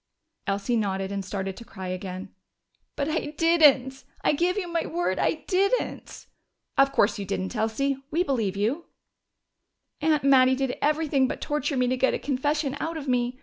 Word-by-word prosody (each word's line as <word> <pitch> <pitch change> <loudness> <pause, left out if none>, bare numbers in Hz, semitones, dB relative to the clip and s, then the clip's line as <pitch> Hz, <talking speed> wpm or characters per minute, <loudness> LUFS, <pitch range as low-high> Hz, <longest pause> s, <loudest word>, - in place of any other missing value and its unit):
Elsie 200 +5 0
nodded 195 -2 -1
and 200 -1 -3
started 195 0 -4
to 235 - -10
cry 190 -5 -8
again. 185 +1 -6 0.6
"But 280 - -1
I 310 -1 -2
didn't! 285 -6 +4 0.2
I - - +3
give 350 +5 +1
you 380 -4 -2
my 335 -1 -1
word 330 - -1
I 315 - 0
didn't!" 395 +6 -1 0.5
"Of 275 0 +4
course 210 -3 +2
you 200 - -4
didn't, 195 +2 -3
Elsie. 230 +5 0
We 335 +4 +1
believe 225 - -1
you." 245 +12 -1 1.2
"Aunt 305 -2 +2
Mattie 260 -1 +5
did 265 -1 -1
everything 295 -3 +2
but - - -4
torture 295 -1 -1
me 250 - +3
to 255 +1 0
get 265 +1 +2
a - - 0
confession 290 +1 -1
out 325 +1 -3
of 290 -2 -7
me. 250 0 0
265 Hz, 175 wpm, -26 LUFS, 210-305 Hz, 1.2 s, Mattie